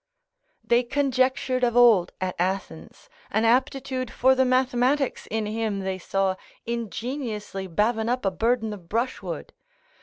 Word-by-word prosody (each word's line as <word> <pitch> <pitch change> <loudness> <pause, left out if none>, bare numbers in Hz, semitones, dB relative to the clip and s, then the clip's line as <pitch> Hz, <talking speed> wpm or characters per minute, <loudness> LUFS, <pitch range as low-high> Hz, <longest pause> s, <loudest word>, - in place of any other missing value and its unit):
They 235 +1 +3
conjectured 260 -1 0
of 240 -1 +2
old 225 -8 +6
at 185 -1 -2
Athens, 175 - -3 0.2
an 220 +2 +1
aptitude 260 +1 +1
for 260 +2 +3
the 260 0 +3
mathematics 255 +2 +1
in 220 0 -1
him 215 -2 -2
they 190 0 -3
saw 190 +1 0 0.3
ingeniously 230 - -4
bavin 220 +5 0
up 250 -2 -1
a 195 - +2
burthen 225 +2 0
of 175 -5 -12
brushwood. 235 +4 -3
235 Hz, 130 wpm, -25 LUFS, 195-255 Hz, 0.3 s, old